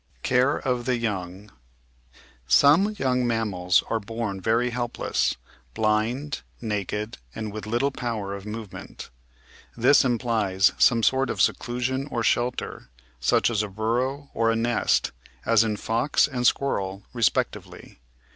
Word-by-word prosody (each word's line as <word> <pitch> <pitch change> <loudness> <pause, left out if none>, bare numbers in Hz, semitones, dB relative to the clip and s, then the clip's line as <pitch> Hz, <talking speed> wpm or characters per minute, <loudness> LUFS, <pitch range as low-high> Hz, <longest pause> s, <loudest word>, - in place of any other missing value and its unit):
Care 130 +3 +2
of 125 -3 -2
the 125 -1 +1
Young 100 -3 -4 1.0
Some 165 - +5
young 125 -2 +1
mammals 95 -6 +1
are 115 - 0
born 110 -2 -4
very 115 +4 +1
helpless 120 0 -1 0.2
— - - -33
blind, 110 +7 0 0.2
naked, 105 0 -3 0.2
and 110 -2 -5
with 110 0 -6
little 120 +5 +1
power 115 -7 -4
of 100 -1 -7
movement. 105 -1 -8 0.7
This 130 +5 +5
implies 115 -6 +2
some 115 -3 +4
sort 135 +3 +2
of - - -3
se - - +4
clusion 130 +3 -3
or 120 -2 -1
shelter, 120 - -1 0.3
such 65 - +2
as 110 -2 +1
a 105 - -2
burrow 125 +7 -2
or 115 0 +1
a 115 - +2
nest, 115 0 +1 0.3
as 115 -1 +5
in 110 -2 -1
Fox 115 +7 +1
and 125 -4 0
Squirrel 100 -7 -1
respectively. 115 - -2
115 Hz, 135 wpm, -25 LUFS, 105-125 Hz, 1.0 s, Some